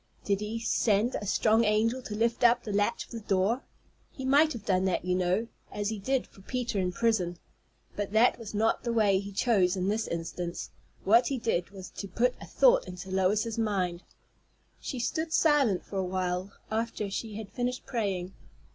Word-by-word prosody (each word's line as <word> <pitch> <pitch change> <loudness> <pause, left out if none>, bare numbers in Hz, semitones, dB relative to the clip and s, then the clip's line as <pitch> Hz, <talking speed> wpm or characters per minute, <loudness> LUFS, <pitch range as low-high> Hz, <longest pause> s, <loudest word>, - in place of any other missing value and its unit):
Did 200 -1 +1
he 210 +2 -3
send 225 0 +1
a 205 - -4
strong 220 +3 +3
angel 225 +4 +2
to 215 -4 -6
lift 230 +2 0
up 240 0 +5
the 210 - -4
latch 205 +3 0
of - - -24
the 230 - -5
door? 205 +4 +1 0.5
He 265 - -7
might 290 +4 +5
have 220 -3 -8
done 185 -1 +2
that, 185 -2 0
you 180 - +1
know, 185 +5 +1 0.2
as 205 0 -2
he 220 -2 -4
did 265 +6 0
for 195 - -18
Peter 240 -1 -2
in 180 -1 0
prison. 185 -5 0 0.6
But 205 -1 -3
that 225 +4 +4
was 220 -2 -7
not 225 +2 +2
the 235 - -2
way 210 -4 +3
he 200 +1 -7
chose 195 -4 +2
in 185 +1 -1
this 220 +2 -1
instance. 170 +1 -4 0.3
What 230 +5 +5
he 275 - -1
did 225 -7 -1
was 195 -2 -10
to 200 - -6
put 240 +6 +1
a - - -9
thought - - +4
into 180 +1 -8
Lois's 205 +4 +1
mind. 185 -5 0 0.8
She 265 - -5
stood 315 +7 -2
silent 290 - +3
for 200 - -6
a 190 - +1
while 185 +1 -2 0.2
after 220 -2 -2
she 215 +1 -4
had 210 -1 -7
finished 250 0 -3
praying. 195 -6 -2
210 Hz, 195 wpm, -29 LUFS, 190-235 Hz, 0.8 s, up